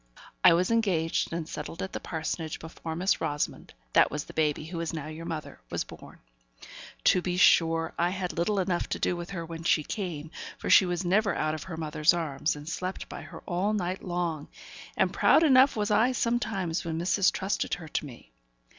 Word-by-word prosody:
I 175 - +9
was 180 +5 +2
engaged 190 -8 +1
and 165 -2 -3
settled 170 +2 -6
at 190 - -6
the - - -3
parsonage 160 -1 -4
before 160 0 -7
Miss 185 +4 +1
Rosamond 145 - -3 0.2
(that - - +6
was 150 0 -3
the - - -12
baby, 150 -1 0
who 165 +1 -5
is 170 0 -3
now 155 -3 -4
your 155 +2 -7
mother) 160 - -6
was - - -2
born. - - -13 0.9
To 180 - +4
be 180 0 -2
sure, 165 -3 +4
I 175 +1 +3
had 185 -1 -3
little 185 +5 0
enough 180 -2 -1
to - - -2
do 180 - +1
with 175 0 -6
her 170 -4 -5
when 165 0 -7
she 160 -2 +2
came, 165 -5 -5 0.3
for - - -2
she 190 - +7
was 175 +1 -2
never 200 +3 +2
out 155 0 0
of 155 - -5
her 175 -4 -6
mother's 155 +1 +2
arms, 150 -3 -1
and 145 +1 -10
slept 185 +3 -4
by - - -7
her - - -10
all 190 +4 -1
night 185 -2 -2
long; 175 -4 -2 0.5
and - - +2
proud 320 - +5
enough 270 -2 +6
was 210 -1 -1
I 225 +5 +4
sometimes 215 -9 -1
when 160 -1 -3
missis 185 +3 +3
trusted 195 +1 -1
her 175 -3 -10
to 155 - -2
me. 120 - -13
175 Hz, 205 wpm, -28 LUFS, 160-190 Hz, 0.9 s, I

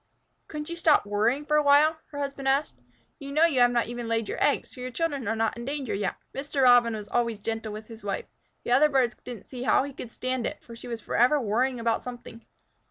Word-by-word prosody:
"Couldn't 300 -1 -6
you 340 - -5
stop 325 -7 +3
worrying 220 +8 0
for 300 0 +2
a - - +5
while?" 295 +2 +5
her 290 - -9
husband 275 -1 -4
asked. 275 +3 0 0.4
"You 280 -1 -7
know 310 +3 +4
you 295 -6 +1
have 245 0 +6
not 240 -1 +1
even 240 0 -6
laid 225 -1 -1
your - - -2
eggs, - - +1
so 255 - -10
your 255 - -4
children 285 -3 -2
are 225 - 0
not 225 0 0
in 235 - -7
danger 275 -1 -3
yet." 195 -2 -2 0.2
Mr. 275 0 -2
Robin 245 -2 +6
was 210 -1 -7
always 235 -1 0
gentle 225 +1 -4
with 215 +1 -7
his 225 -1 -12
wife. 200 -1 -3 0.4
The - - -4
other 285 +5 +5
birds 260 -4 +2
didn't 240 -5 -8
see 250 -2 -8
how 255 - +3
he 280 0 -6
could 240 -2 -8
stand 255 0 -2
it, - - -5
for 235 - -11
she 230 - -10
was 230 -2 -5
forever 250 +8 +3
worrying 245 +2 0
about 230 -1 0
something. 240 -2 -9
245 Hz, 240 wpm, -27 LUFS, 230-280 Hz, 0.4 s, have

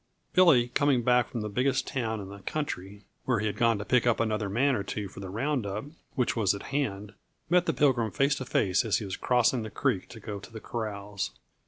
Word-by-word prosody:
"_ - - -42
Billy, 150 -10 +6
coming 135 -1 +2
back 125 +1 +3
from 115 - -4
the 105 - -3
biggest 125 +6 +1
town 110 -4 -2
in 95 -1 -7
the 100 0 -9
country, 100 -6 -4 0.2
where 125 -3 +2
he 110 - -1
had 105 - -1
gone 115 -2 +3
to 105 - -5
pick 125 -1 +3
up 120 - +3
another 110 -2 0
man 130 +7 +2
or 105 - 0
two 100 +1 -4
for 95 - -11
the 95 -1 -6
round 130 +6 -1
up 100 +3 -4 0.3
which 125 -3 +1
was 105 -3 +2
at 100 - -8
hand, 105 -7 -2 0.4
met 180 0 +4
the - - +4
Pilgrim 130 -6 +2
face 140 +9 +2
to 130 - -5
face 95 -1 +2
as 110 -3 +2
he 110 - -4
was 95 - -4
crossing 125 0 +2
the 110 - -5
creek 110 -6 -1
to 115 - -10
go 105 -1 -6
to 100 +3 -13
the 110 - -7
corrals. 100 -4 -4
115 Hz, 240 wpm, -28 LUFS, 100-125 Hz, 0.4 s, Billy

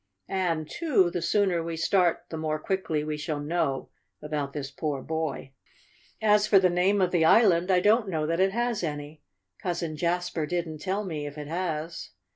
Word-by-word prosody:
And, 170 -5 -1
too, 245 - +2
the 175 - -2
sooner 190 -4 +2
we 165 0 -4
start 175 +1 +2
the - - -5
more 155 -1 -1
quickly 160 -2 -1
we 155 0 -3
shall 150 0 -3
know 145 -3 -1 0.3
about 150 -2 -3
this 140 -1 -5
poor 145 0 -3
boy. 160 -4 -3 0.7
"As 210 -1 +4
for 205 - +6
the 185 -2 +4
name 190 +3 +2
of 180 -1 +2
the 175 -3 +3
island, 180 -1 +5
I 180 -1 +4
don't 215 +1 +3
know 160 -4 -1
that 165 +2 -1
it 190 +1 +3
has 235 0 -1
any. 150 -1 -5 0.4
Cousin 170 -3 -2
Jasper 170 -1 -1
didn't 165 -2 -3
tell 195 +5 -2
me, 150 -5 -4
if 145 +1 -9
it 150 -1 -6
has. 165 -1 -3
170 Hz, 185 wpm, -27 LUFS, 155-190 Hz, 0.7 s, for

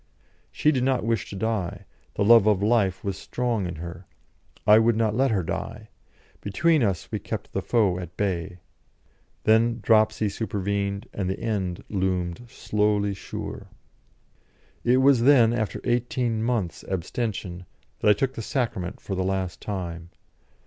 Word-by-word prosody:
She 150 - +2
did 130 -4 0
not 130 -3 +1
wish 115 -5 -1
to - - -7
die, 100 -3 -2 0.3
the - - +1
love 115 -1 +7
of 100 -2 +3
life 105 -4 +2
was 100 -1 -3
strong 120 -6 -2
in 85 - -5
her; 85 +2 -8 0.6
I 105 +1 +7
would 110 0 +3
not 110 -2 +1
let 135 +3 +3
her 100 -5 +1
die; - - -5 0.5
between 155 - +2
us 100 -7 -1
we - - -2
kept - - -6
the - - -1
foe 100 -7 +2
at 90 -1 -9
bay. 95 -2 -2 0.9
Then 115 +2 +3
dropsy 110 -1 +3
supervened, 100 0 -2
and 95 -3 -2
the 95 - -3
end 100 -6 -2
loomed 95 +2 -2
slowly 105 -2 0
sure. 95 - -7 1.2
It 125 +1 +4
was 130 -2 +5
then, 120 -3 +6
after 110 -4 -2
eighteen 120 -1 0
months' 110 -8 -1
abstention, 95 -1 -3 0.3
that - - +3
I - - +8
took 130 +5 -1
the - - -5
Sacrament 110 -7 -2
for 100 - -6
the 95 0 0
last 95 -2 -2
time. 85 -4 -5
105 Hz, 155 wpm, -25 LUFS, 95-115 Hz, 1.2 s, I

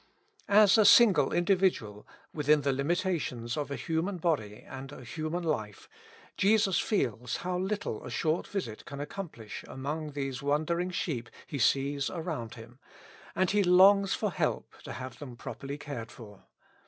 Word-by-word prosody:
As 205 +1 +6
a - - +7
single 200 - +6
individual, 175 - +1 0.3
within 150 0 +3
the 140 -1 +1
limitations 140 -5 -1
of 145 -2 -3
a 140 - -3
human 165 +6 -2
body 130 -12 -1
and 135 +1 -8
a 130 - -10
human 155 +7 -4
life, 110 -11 -3 0.5
Jesus 205 -1 +3
feels 125 - -1
how 180 0 -1
little 190 - -3
a - - -7
short 155 +7 -1
visit 120 - -5
can 140 - -8
accomplish 145 - -7
among 150 +3 -5
these 135 -2 -3
wandering 155 +5 0
sheep 150 -9 -3 0.2
He 140 - -5
sees 140 +3 +1
around 160 -10 -5
Him, 120 +2 -13 0.6
and 185 -1 +2
He 205 0 +3
longs 195 +2 +6
for - - -1
help - - -2
to - - -6
have 130 -1 -8
them 130 -5 -8
properly 140 +4 -7
cared 140 -6 -7
for. 105 -4 -13
150 Hz, 155 wpm, -30 LUFS, 125-180 Hz, 0.6 s, a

